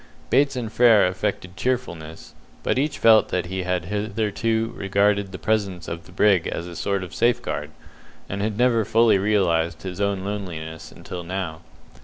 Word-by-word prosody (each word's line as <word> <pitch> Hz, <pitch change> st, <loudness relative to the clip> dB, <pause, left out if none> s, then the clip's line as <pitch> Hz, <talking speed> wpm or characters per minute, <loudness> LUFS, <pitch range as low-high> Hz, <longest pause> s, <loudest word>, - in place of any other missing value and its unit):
Bates 140 Hz, -1 st, +3 dB
and 115 Hz, -3 st, -4 dB
Frere 115 Hz, -5 st, +6 dB
affected 90 Hz, 0 st, -2 dB
cheerfulness, 90 Hz, -9 st, -4 dB, 0.3 s
but -, -, +1 dB
each 145 Hz, 0 st, -1 dB
felt 110 Hz, -1 st, +5 dB
that 90 Hz, -2 st, -1 dB
he 95 Hz, +2 st, -3 dB
had 90 Hz, -2 st, -1 dB
hitherto 110 Hz, +3 st, -1 dB
regarded 100 Hz, 0 st, +1 dB
the 95 Hz, -, -6 dB
presence 100 Hz, -5 st, -1 dB
of 85 Hz, 0 st, -6 dB
the -, -, -15 dB
brig 95 Hz, -2 st, +3 dB
as 85 Hz, -, -4 dB
a 90 Hz, -1 st, -8 dB
sort 100 Hz, +1 st, -1 dB
of 90 Hz, -4 st, -9 dB
safeguard, 120 Hz, -10 st, 0 dB, 0.6 s
and 100 Hz, +1 st, -4 dB
had 105 Hz, 0 st, -2 dB
never 120 Hz, -2 st, +3 dB
fully 110 Hz, -1 st, +4 dB
realized 85 Hz, -5 st, +1 dB
his 95 Hz, +1 st, -5 dB
own 100 Hz, -2 st, 0 dB
loneliness 85 Hz, -6 st, -6 dB
until 90 Hz, -1 st, -8 dB
now. 85 Hz, -2 st, -4 dB
100 Hz, 165 wpm, -23 LUFS, 90-110 Hz, 0.6 s, Frere